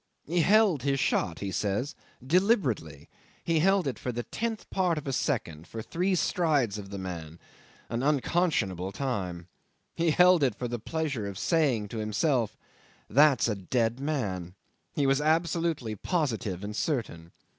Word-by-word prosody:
He 175 +3 0
held 200 - +4
his 135 +1 0
shot, 85 - 0
he 100 -1 -3
says, 105 +9 -1 0.3
deliberately. 135 - +1 0.4
He 165 -1 +2
held 195 +2 +3
it 130 -6 -3
for 125 - -3
the 120 0 -3
tenth 225 - -4
part 180 -4 +1
of 150 - -5
a 135 - -2
second, 85 - -2
for 110 -1 -6
three 185 - 0
strides 145 - +1
of 100 -1 -9
the 100 - -6
man 85 -4 -6 0.5
an 115 +1 -2
unconscionable 135 - +1
time. 95 -10 -3 0.5
He 170 0 +1
held 180 +1 +6
it 130 -6 +2
for 125 - -4
the 120 0 -4
pleasure 140 -6 -2
of 100 -2 -6
saying 130 - +1
to 115 - -5
himself, 110 +2 0 0.5
That's 145 -2 +5
a 110 - +1
dead 115 +5 -1
man! 100 - -3 0.4
He 145 - +1
was 135 +1 +3
absolutely 160 -6 0
positive 110 - -2
and 105 +1 -5
certain. 105 - -2
130 Hz, 155 wpm, -28 LUFS, 100-160 Hz, 0.5 s, held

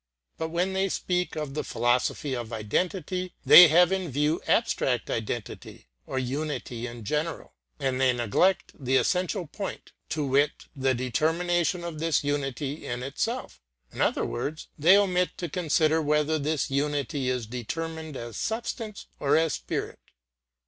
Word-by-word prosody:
But 160 - -2
when 180 +3 0
they 190 +1 +1
speak 180 0 -1
of 150 -3 -4
the 150 - -2
philosophy 125 +3 0
of 120 -2 -5
identity 180 - -2
they 180 - +11
have 175 +3 +5
in 190 -3 -1
view 150 +4 0
abstract - - +1
identity 65 - -5 0.2
or 135 - -4
unity 130 -2 -3
in 120 -1 -9
general; 150 +9 -3 0.3
and 135 -2 -1
they 130 -1 +5
neglect 120 - +1
the 130 -1 -1
essential 185 +2 0
point, 195 +6 -7 0.2
to 150 -2 -1
wit, 140 +2 +1
the 135 -1 +1
determination 170 +7 0
of 170 -3 -5
this 165 -1 +1
unity 145 0 -2
in 120 +1 -3
itself; 225 - -3 0.3
in - - -4
other - - +2
words, 145 +6 -4
they 170 +6 +6
omit 180 -3 +1
to 175 - -3
consider 160 -1 +2
whether 150 +1 +1
this 150 -1 -1
unity 140 -1 -1
is 125 -3 -1
determined 160 +6 -5
as 115 -2 -7
substance 225 -1 -4
or 140 - +3
as 160 -2 +2
spirit. - - -4
150 Hz, 150 wpm, -27 LUFS, 130-175 Hz, 0.3 s, they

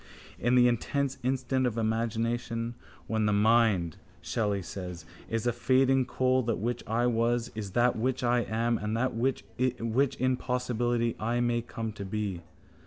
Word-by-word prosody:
In 120 +2 +2
the 125 -1 +6
intense 135 +3 -1
instant 130 0 0
of 115 -2 -3
imagination, 115 +1 -1 0.3
when 110 -1 0
the - - +2
mind, 105 -5 +3 0.2
Shelley 105 -4 -1
says, 90 -2 -7 0.2
is 115 0 -1
a 120 - +2
fading 130 +2 +3
coal, 130 +1 +2
that 115 -2 -1
which 120 +3 -2
I 115 +3 +1
was 120 0 +1
is 105 -3 -6
that 120 +2 +3
which 130 +3 -1
I 120 0 +3
am 115 +1 0
and 105 +2 -2
that 130 +2 0
which 125 +4 0 0.2
in 130 +1 +1
possibility 120 -2 0
I 120 +2 0
may 120 -1 +1
come 115 -1 -5
to 100 - -7
be. 100 -3 -3
120 Hz, 160 wpm, -29 LUFS, 110-125 Hz, 0.3 s, the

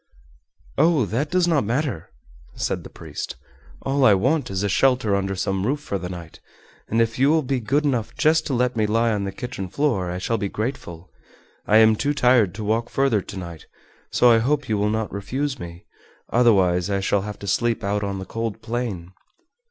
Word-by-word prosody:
"Oh, 155 -7 +4
that 125 +9 -2
does 180 0 +2
not 160 -5 +2
matter," 120 - -2 0.5
said - - -2
the - - -10
priest; - - -7 0.5
"all 135 +1 +1
I 105 -6 +7
want 135 +10 +1
is 95 0 -2
a - - +1
shelter 125 0 +2
under 95 0 -1
some 95 0 -1
roof 145 +3 0
for 100 -10 -4
the 90 0 -5
night, 85 -3 -9 0.5
and 115 - 0
if 115 +1 +1
you 135 +2 +4
will 160 0 +3
be 135 0 -1
good 140 +7 0
enough 125 -6 -1
just 160 +1 +2
to 135 - -1
let 125 0 +1
me 110 -2 +1
lie 115 +2 +2
on 105 -2 -1
the 100 - -3
kitchen 95 -2 -6
floor 115 -9 0
I 90 - -3
shall 115 +5 -1
be 100 - -2
grateful. 95 -8 -5 0.6
I 110 - +5
am 110 0 +6
too 145 +6 -1
tired 125 -9 +3
to 110 - -5
walk 110 +3 0
further 135 -7 +1
to 100 - -9
night, 85 -3 -8 0.4
so 125 - +4
I 115 - +5
hope 140 +3 0
you 105 -2 0
will 105 +1 +1
not 110 0 -2
refuse 130 +7 -3
me, 85 -2 -9 0.5
otherwise 95 -7 +3
I 100 -1 0
shall 95 +1 +1
have 105 +1 -6
to - - -9
sleep 115 +3 0
out 100 +1 -1
on 100 -1 -3
the 95 - -6
cold 115 +1 -4
plain." 110 -7 -4
110 Hz, 205 wpm, -23 LUFS, 100-130 Hz, 0.6 s, I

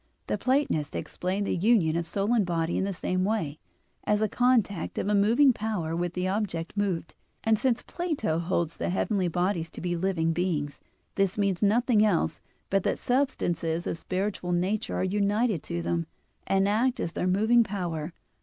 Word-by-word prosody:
The - - -1
Platonists 255 - 0
explain 190 +3 -2
the - - -1
union 180 -4 +3
of 170 0 -1
soul 200 +6 0
and 225 -3 +4
body 170 -2 -1
in - - 0
the 200 - -1
same 185 0 -1
way, 185 -8 -1 0.4
as 210 0 +2
a 215 - +2
contact 225 -6 +1
of - - -1
a 210 - +2
moving 230 +7 +5
power 205 -8 -2
with 175 0 -2
the 180 0 -1
object 185 -4 -2
moved, 195 -5 -1 0.3
and 220 -1 +3
since 250 -3 +1
Plato 300 - -2
holds 170 -1 -1
the - - -2
heavenly 190 0 0
bodies 175 -1 -1
to - - -10
be 175 -1 -2
living 165 -2 0
beings, 160 -5 -1 0.3
this 195 0 0
means 200 -3 0
nothing 220 +1 +3
else 180 - +1 0.3
but 195 0 +3
that - - 0
substances 175 - 0
of - - -2
spiritual 185 +1 -2
nature 185 +5 -1
are - - 0
united 205 0 +1
to 85 0 -4
them, 85 0 -1 0.4
and 195 0 +3
act 240 +5 +1
as 165 - -2
their 180 - -2
moving 220 +6 +4
power. 175 -6 -4
190 Hz, 180 wpm, -27 LUFS, 170-215 Hz, 0.4 s, moving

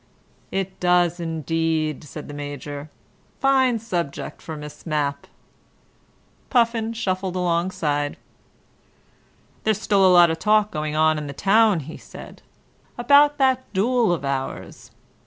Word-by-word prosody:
"It 190 -1 -3
does 175 -1 +2
indeed," 160 -2 -1
said 150 +1 -9
the 145 - -8
Major. 145 0 -7 0.5
"Fine 265 -3 +3
subject 180 -10 -4
for 160 -1 -7
Miss 150 0 -10
Mapp." 145 -3 -2 1.2
Puffin 230 -3 +1
shuffled 185 -4 -2
alongside. 170 -5 -1 1.5
"There's 215 -2 +1
still 200 -3 +2
a 190 - +6
lot 175 -2 +6
of 160 - -4
talk 215 0 +3
going 150 0 -3
on 155 0 +3
in 150 - -6
the 140 - -6
town," 205 +1 +3
he 155 +4 -9
said, - - -12 0.6
"about 285 +4 +5
that 260 -1 +1
duel 230 +2 +2
of 165 -5 -2
ours. 135 -1 -5
175 Hz, 125 wpm, -23 LUFS, 150-220 Hz, 1.5 s, a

